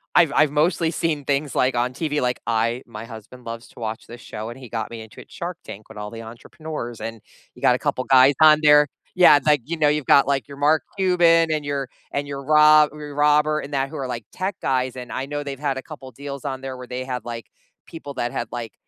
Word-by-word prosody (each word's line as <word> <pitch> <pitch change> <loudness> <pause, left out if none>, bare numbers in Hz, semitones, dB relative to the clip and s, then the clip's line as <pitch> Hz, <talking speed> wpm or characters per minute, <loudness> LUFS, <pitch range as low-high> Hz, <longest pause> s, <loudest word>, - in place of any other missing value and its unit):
I've 165 -5 +5
I've 150 -1 +4
mostly 160 +2 +1
seen 160 -3 -1
things, 140 +1 -1
like, 130 0 +1
on 125 +1 0
TV, 150 +1 -2
like, 125 0 -1
I 115 +2 0
my 110 0 -8
husband 115 +2 -12
loves 115 +1 -7
to - - -16
watch 110 -1 -5
this 120 +1 -11
show, 110 +1 -7
and 120 - -9
he 125 -4 -11
got 115 -1 -4
me 115 -1 -8
into 110 - -12
it, - - -18
Shark 175 0 -6
Tank 105 +2 -10
with 110 - -13
all 105 0 -5
the 115 +1 -9
entrepreneurs, 120 +1 -8
and 115 -2 -6 0.3
you - - -17
got - - +4
a - - -4
couple 130 - -1
guys 130 +1 +6
on 155 -1 +8
there 150 0 +6 0.3
Yeah, 180 -5 +7
it's 145 - -6
like, 150 -3 +4
you 165 +2 -4
know, 150 -1 +3
you've 150 -2 -1
got, 140 - +6
like, 140 -1 0
your 140 -1 -11
Mark 150 +2 +3 0.2
Cuban 170 -3 +4
and 155 -1 -1
your 140 -2 -3 0.2
and 145 0 -3
your 140 -1 -6
Rob 150 0 +6
Robert 150 +1 +1
and 145 +1 -9
that 135 0 0
who 155 - -8
are, 135 -2 -3
like, 115 -3 -5
tech 185 +1 -3
guys 130 -1 0
and 125 -1 -8
I 135 +1 -4
know 145 0 -4
they've 140 -1 -6
had 140 -3 -1
a 130 - -6
couple 140 -4 -10
deals 140 +2 -8
on 135 -2 -4
there 135 -1 -6
where 125 -1 -10
they 125 +1 -4
had, 125 -2 -4
like, 115 -2 -7 0.3
people 145 -4 -9
that 120 0 -2
had, 120 - -3
like, 120 -4 -6
140 Hz, 250 wpm, -22 LUFS, 120-150 Hz, 0.3 s, on